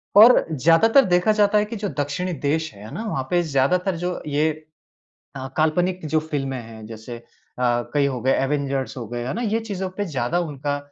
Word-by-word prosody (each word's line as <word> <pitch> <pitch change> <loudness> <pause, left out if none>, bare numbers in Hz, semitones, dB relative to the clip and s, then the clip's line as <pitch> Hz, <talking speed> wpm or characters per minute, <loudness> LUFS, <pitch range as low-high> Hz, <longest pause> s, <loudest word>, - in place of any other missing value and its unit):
और 225 +5 +8
ज़्यादातर 165 - +5
देखा 180 +3 +3
जाता 210 0 +3
है 210 - +3
कि 225 +2 -7
जो 205 -1 -3
दक्षिणी 145 +6 -2
देश 155 +1 -1
हैं, 100 +1 -12
है 110 - -10
ना? 220 - -4
वहाँ 135 -11 -2
पे 175 -1 +3
ज़्यादातर 170 +6 +1
जो 180 0 -3
ये 150 +2 +1 0.9
अ, 135 -1 -5
काल्पनिक 175 +3 +1
जो 155 +1 +2
फ़िल्में 140 -4 -3
हैं 110 -1 -11
जैसे 115 +2 -8
अ, 115 - -16 0.7
कई 145 -1 +3
हो 135 -3 -1
गए 130 +3 +2
एवेंजर्स 135 -1 -2
हो 120 -3 -5
गए 120 +1 -4
है - - -2
ना? 235 - -3
ये 225 -1 0
चीज़ों 195 -4 -4
पे 205 - -1
ज़्यादा 155 0 -1
उनका, 145 -3 -3
155 Hz, 205 wpm, -22 LUFS, 135-185 Hz, 0.9 s, और